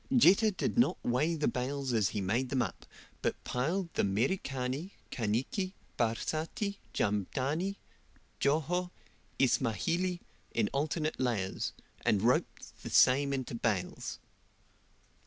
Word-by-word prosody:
Jetta 215 Hz, 0 st, +7 dB
did 210 Hz, +3 st, -1 dB
not 240 Hz, -, +4 dB
weigh 150 Hz, +8 st, +2 dB
the 150 Hz, -2 st, 0 dB
bales 130 Hz, 0 st, -1 dB
as 110 Hz, -4 st, +3 dB
he 105 Hz, -, -2 dB
made 115 Hz, +7 st, 0 dB
them 130 Hz, -2 st, +2 dB
up, -, -, -7 dB, 0.3 s
but -, -, -1 dB
piled 170 Hz, +8 st, -1 dB
the -, -, +1 dB
Merikani, 130 Hz, -, -1 dB, 0.2 s
Kaniki, 130 Hz, -, -1 dB, 0.2 s
Barsati, 160 Hz, -, -1 dB
Jamdani, 135 Hz, -, 0 dB, 0.6 s
Joho, 160 Hz, +5 st, +1 dB, 0.5 s
Ismahili, 135 Hz, -, +1 dB, 0.3 s
in 110 Hz, -3 st, +2 dB
alternate 155 Hz, +2 st, -1 dB
layers, 115 Hz, -7 st, -1 dB, 0.3 s
and 100 Hz, -1 st, +2 dB
roped 125 Hz, +2 st, 0 dB
the -, -, -6 dB
same 140 Hz, +2 st, +5 dB
into 130 Hz, -3 st, -2 dB
bales. 110 Hz, -5 st, -1 dB
135 Hz, 115 wpm, -32 LUFS, 115-170 Hz, 0.6 s, Jetta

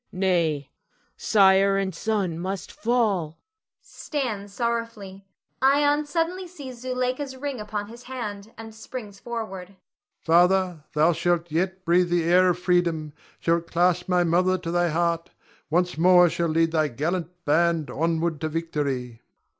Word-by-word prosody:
Nay, 170 Hz, -7 st, 0 dB, 0.4 s
sire 195 Hz, -1 st, +4 dB
and 195 Hz, -1 st, -1 dB
son 195 Hz, -4 st, -2 dB
must 190 Hz, +2 st, -4 dB
fall! 205 Hz, -9 st, 0 dB, 0.4 s
[Stands 220 Hz, -9 st, -4 dB
sorrowfully. 225 Hz, -4 st, -4 dB, 0.3 s
Ion 290 Hz, +2 st, +3 dB
suddenly 350 Hz, +4 st, -2 dB
sees 270 Hz, -8 st, -10 dB
Zuleika's 255 Hz, +2 st, -2 dB
ring 275 Hz, -2 st, -4 dB
upon 210 Hz, -1 st, -4 dB
his 235 Hz, +2 st, -12 dB
hand, 215 Hz, -5 st, -6 dB
and 225 Hz, -1 st, -9 dB
springs 220 Hz, -2 st, -9 dB
forward.] 215 Hz, -6 st, -6 dB
Ion. 195 Hz, 0 st, -23 dB, 0.4 s
Father, 180 Hz, 0 st, +3 dB
thou 155 Hz, +3 st, +4 dB
shalt 175 Hz, 0 st, 0 dB
yet 185 Hz, +3 st, -1 dB
breathe 175 Hz, +1 st, +3 dB
the 175 Hz, -1 st, +1 dB
air 180 Hz, +2 st, +4 dB
of 175 Hz, -, +1 dB
freedom, 170 Hz, -4 st, 0 dB, 0.3 s
shall 170 Hz, 0 st, +1 dB
clasp 175 Hz, +2 st, 0 dB
my 180 Hz, -1 st, +3 dB
mother 180 Hz, +2 st, +2 dB
to 170 Hz, -2 st, -5 dB
thy 175 Hz, 0 st, +2 dB
heart; 170 Hz, +1 st, 0 dB, 0.4 s
once 175 Hz, +1 st, 0 dB
more 180 Hz, 0 st, +6 dB
shall 170 Hz, -, -1 dB
lead 165 Hz, +1 st, +2 dB
thy 155 Hz, -2 st, +2 dB
gallant 160 Hz, +6 st, -2 dB, 0.2 s
band 165 Hz, 0 st, +2 dB
onward 165 Hz, 0 st, -1 dB
to 155 Hz, -, -1 dB
victory. 140 Hz, -7 st, -3 dB
180 Hz, 140 wpm, -25 LUFS, 165-220 Hz, 0.4 s, more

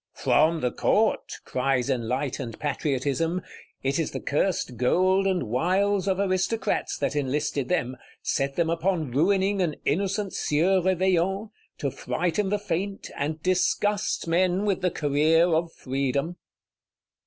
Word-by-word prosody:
From 160 Hz, 0 st, +2 dB
the 125 Hz, -, 0 dB
Court! -, -, +1 dB
cries 130 Hz, -1 st, 0 dB
enlightened 125 Hz, -1 st, -2 dB
Patriotism: 150 Hz, +4 st, -1 dB, 0.4 s
it 135 Hz, +3 st, 0 dB
is 165 Hz, -, 0 dB
the -, -, -5 dB
cursed 150 Hz, -4 st, -1 dB
gold 185 Hz, +10 st, +2 dB
and 185 Hz, -2 st, +1 dB
wiles 185 Hz, -, +1 dB
of 190 Hz, -1 st, +1 dB
Aristocrats 190 Hz, +3 st, 0 dB
that 145 Hz, 0 st, -1 dB
enlisted 145 Hz, -1 st, -1 dB
them; 130 Hz, -8 st, -1 dB, 0.3 s
set 135 Hz, 0 st, -1 dB
them 170 Hz, -1 st, +1 dB
upon 165 Hz, -3 st, 0 dB
ruining 190 Hz, +7 st, +2 dB
an 165 Hz, -4 st, 0 dB
innocent 195 Hz, +6 st, 0 dB
Sieur 180 Hz, +6 st, +2 dB
Réveillon; 190 Hz, +3 st, +1 dB, 0.3 s
to 140 Hz, -, -2 dB
frighten 180 Hz, +8 st, -1 dB
the 205 Hz, -, +1 dB
faint, 195 Hz, 0 st, -4 dB
and 155 Hz, +2 st, -3 dB
disgust 190 Hz, +2 st, +1 dB
men 180 Hz, +3 st, +2 dB
with 200 Hz, -3 st, 0 dB
the 180 Hz, -, +2 dB
career 155 Hz, +2 st, +3 dB
of 165 Hz, -1 st, +1 dB
Freedom. 140 Hz, +5 st, -2 dB
165 Hz, 130 wpm, -26 LUFS, 140-190 Hz, 0.4 s, career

